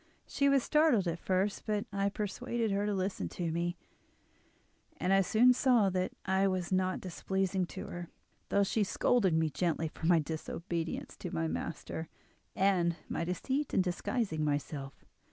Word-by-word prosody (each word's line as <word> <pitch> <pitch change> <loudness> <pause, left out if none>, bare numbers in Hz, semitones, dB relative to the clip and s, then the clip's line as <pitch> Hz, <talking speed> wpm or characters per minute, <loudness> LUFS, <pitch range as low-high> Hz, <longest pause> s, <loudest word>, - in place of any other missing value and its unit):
She 280 -1 +2
was 275 -2 +4
startled 300 - +3
at 170 0 -2
first; 190 +4 -1
but 210 0 0
I 200 0 +1
persuaded 220 +3 -2
her 200 +1 0
to 210 - 0
listen 190 +1 -2
to 170 -2 -3
me, 170 +2 -1 1.2
and 185 - +1
I 195 - +6
soon 235 +6 +5
saw 240 -6 +3
that 185 0 0
I 190 +1 +3
was 185 -2 -1
not 185 0 +1
displeasing 190 0 -1
to - - -7
her, 175 -1 -7 0.4
though 200 - +3
she 210 +2 +1
scolded 195 -2 +2
me 160 -1 +2
gently 160 +2 0
for 160 - -4
my 175 -1 +6
disobedience 165 +2 -3
to - - -5
my 80 0 -1
master, 85 - -4 0.5
and 180 -3 +2
my - - -1
deceit 260 - -2
in 190 - +4
disguising 180 -2 -1
myself. 145 -2 -3
185 Hz, 160 wpm, -32 LUFS, 170-205 Hz, 1.2 s, I